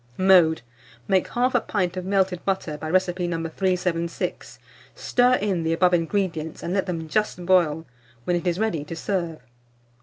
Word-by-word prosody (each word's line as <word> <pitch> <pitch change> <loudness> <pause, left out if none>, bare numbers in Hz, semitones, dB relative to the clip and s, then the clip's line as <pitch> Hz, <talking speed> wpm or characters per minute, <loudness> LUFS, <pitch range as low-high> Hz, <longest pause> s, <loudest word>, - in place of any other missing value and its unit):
Mode. 180 -7 +5 0.4
Make 190 -2 +2
1/2 245 -1 0
pint 185 -4 -1
of 185 -1 -4
melted 190 -2 0
butter, 190 -5 -2
by 155 +1 -6
recipe 180 0 +1
No. 170 -1 -2
376; 175 -1 -2 0.4
stir 250 0 +2
in 195 -6 -1
the 165 0 0
above 180 +2 +3
ingredients, 165 -2 -1
and 175 - -3
let 195 -1 0
them 165 -3 -4
just 180 0 -1
boil; 165 -4 +2 0.4
when 175 - 0
it 175 +1 -2
is 175 -1 +1
ready 205 -8 -1
to 160 +3 -7
serve. 170 -2 -2
180 Hz, 160 wpm, -24 LUFS, 165-190 Hz, 0.4 s, Mode